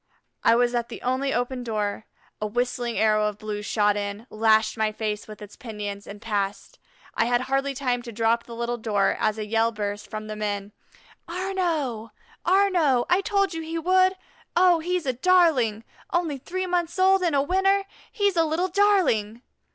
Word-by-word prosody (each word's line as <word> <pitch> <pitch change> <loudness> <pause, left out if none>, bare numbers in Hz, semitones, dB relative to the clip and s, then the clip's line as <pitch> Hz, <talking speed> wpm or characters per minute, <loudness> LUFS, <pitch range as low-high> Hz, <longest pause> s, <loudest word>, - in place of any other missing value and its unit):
I 230 - +5
was 245 0 +2
at 240 -1 -1
the - - -9
only 260 +2 0
open 245 0 -2
door. 215 -2 -3 0.3
A 215 - 0
whistling 240 +1 -2
arrow 215 -1 +3
of 210 -1 -4
blue 210 -1 -5
shot 210 -1 +1
in, 205 +2 -4
lashed 220 0 +3
my 220 -1 0
face 215 -1 -4
with 215 0 -10
its 205 - -12
pinions, 205 -3 -6
and 205 +1 -9
passed. 205 -2 -3 0.3
I - - +1
had 240 +1 +2
hardly 270 +1 -1
time 250 -3 -1
to 240 -1 -8
drop 230 +1 +1
the 235 - -9
little 235 +1 -2
door, 205 -3 +1
as 215 0 +1
a 215 - -3
yell 225 +2 +1
burst 205 -1 -4
from 215 0 -5
the 215 0 -6
men, 205 -1 -3 0.6
"Arnaux! 335 - -2 0.3
Arnaux! 350 -9 +3
I 360 +2 +4
told 395 -2 +1
you 325 - -4
he 325 +1 -4
would. 370 +3 +3 0.4
Oh, 355 -1 +5
he's 355 0 -2
a 260 - 0
darling; 260 -8 +3 0.3
only 335 -6 0
three 370 +7 -4
months 350 -1 -1
old 380 +1 +4
and 340 -5 +1
a 275 - +4
winner 390 +4 +2 0.3
he's 405 -3 +1
a 330 - +4
little 325 +4 0
darling!" 340 - +2
245 Hz, 180 wpm, -25 LUFS, 215-345 Hz, 0.6 s, I